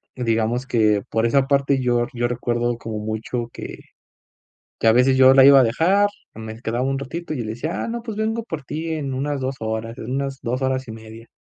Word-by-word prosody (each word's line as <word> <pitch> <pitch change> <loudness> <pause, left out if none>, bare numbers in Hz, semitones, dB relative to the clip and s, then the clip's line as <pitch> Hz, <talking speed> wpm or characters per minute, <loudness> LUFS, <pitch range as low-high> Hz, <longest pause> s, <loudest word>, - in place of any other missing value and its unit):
digamos 115 0 0
que 110 -4 +2
por 115 0 +1
esa 135 +3 +2
parte, 140 -1 +2
yo 120 -1 +1
yo 120 0 0
recuerdo 120 0 -1
como 110 -2 -5
mucho 110 +3 -4
que- - - -8 1.0
que - - +1
a - - +8
veces 125 +3 +4
yo 130 0 +7
la 135 -1 +8
iba 140 0 +9
a - - +6
dejar, 175 - +3 0.3
me 110 0 -8
quedaba 120 +2 -2
un 135 +1 0
ratito, 155 +5 -5
y - - -4
yo 120 - -3
le 110 - -4
decía: 140 +9 -4
"Ah - - -4
no, 235 +1 -4
pues, 225 -3 -6
vengo 220 +1 -1
por 165 -9 -6
ti 155 +5 -5
en 140 -4 -3
unas 140 +2 -2
2 130 +1 -2
horas, 110 +1 -4
en 115 - -6
unas 135 0 -3
2 125 +3 -2
horas 130 0 -1
y - - -7
media. 110 +1 -11
125 Hz, 225 wpm, -22 LUFS, 115-140 Hz, 1.0 s, iba